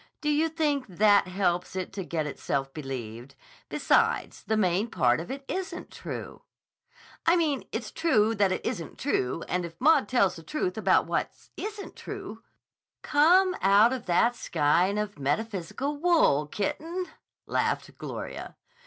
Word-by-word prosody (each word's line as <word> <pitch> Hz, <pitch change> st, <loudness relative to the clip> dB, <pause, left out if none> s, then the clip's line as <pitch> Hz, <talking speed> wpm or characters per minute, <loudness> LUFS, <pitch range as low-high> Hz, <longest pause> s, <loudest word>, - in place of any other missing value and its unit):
Do 300 Hz, -, -1 dB
you 310 Hz, +2 st, +2 dB
think 295 Hz, -4 st, 0 dB
that 205 Hz, +1 st, +4 dB
helps 180 Hz, -1 st, -1 dB
it 185 Hz, 0 st, -4 dB
to 195 Hz, -1 st, -4 dB
get 165 Hz, -3 st, -2 dB
itself 135 Hz, -1 st, -3 dB
believed? 130 Hz, -3 st, -7 dB, 0.3 s
Besides, -, -, +1 dB
the 220 Hz, +1 st, -1 dB
main 195 Hz, +2 st, +1 dB
part 125 Hz, -, +2 dB
of 165 Hz, -, -7 dB
it 275 Hz, +1 st, -6 dB
isn't 380 Hz, 0 st, -5 dB
true." -, -, -7 dB, 0.9 s
"I 335 Hz, -, +6 dB
mean 310 Hz, -5 st, 0 dB
it's -, -, -4 dB
true 225 Hz, -10 st, +2 dB
that 200 Hz, -3 st, +2 dB
it -, -, -3 dB
isn't 165 Hz, -3 st, -4 dB
true, 165 Hz, -, -1 dB
and 180 Hz, 0 st, -1 dB
if 165 Hz, -1 st, -8 dB
Maud 285 Hz, -6 st, +4 dB
tells 195 Hz, -8 st, +2 dB
the -, -, -9 dB
truth 335 Hz, -, -2 dB
about -, -, +3 dB
what -, -, -1 dB, 0.3 s
isn't 425 Hz, -1 st, -6 dB
true—" -, -, -8 dB, 0.6 s
"Come 360 Hz, +6 st, +4 dB
out 205 Hz, +5 st, +5 dB
of 255 Hz, -6 st, -6 dB
that 230 Hz, +8 st, +3 dB
skein 175 Hz, +2 st, +1 dB
of 210 Hz, -5 st, -3 dB
metaphysical 200 Hz, -, -2 dB
wool, 300 Hz, -, +3 dB
kitten," 325 Hz, -, -3 dB, 0.4 s
laughed -, -, -1 dB
Gloria. -, -, -6 dB
205 Hz, 150 wpm, -27 LUFS, -, 0.9 s, I